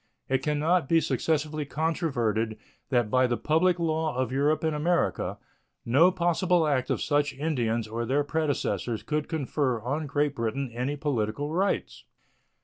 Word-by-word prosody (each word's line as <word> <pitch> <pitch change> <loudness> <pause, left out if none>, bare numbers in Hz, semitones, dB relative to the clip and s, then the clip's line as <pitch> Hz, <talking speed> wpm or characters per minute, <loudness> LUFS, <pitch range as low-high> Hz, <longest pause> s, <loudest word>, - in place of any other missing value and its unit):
It 135 0 +1
can 150 +2 0
not 160 0 +1
be 165 - +5
successfully 155 -1 -1
controverted 135 - -1 0.3
that 120 -5 +1
by 130 0 +4
the 120 -1 0
public 170 +3 +2
law 160 -3 -1
of 130 -1 0
Europe 145 +4 +1
and 160 -1 0
America 170 +4 0 0.5
no 140 +10 +5
possible 175 -1 +2
act 135 -4 0
of - - 0
such 145 -1 +1
Indians 120 -7 -1
or 115 +2 -3
their 135 +5 +1
predecessors 140 - -1
could 150 -1 -2
confer 140 -5 -1
on 145 +7 -3
Great 145 0 0
Britain 120 +1 -2
any 125 +5 -2
political 145 -1 -2
rights. 190 +4 -1
145 Hz, 150 wpm, -27 LUFS, 125-160 Hz, 0.5 s, be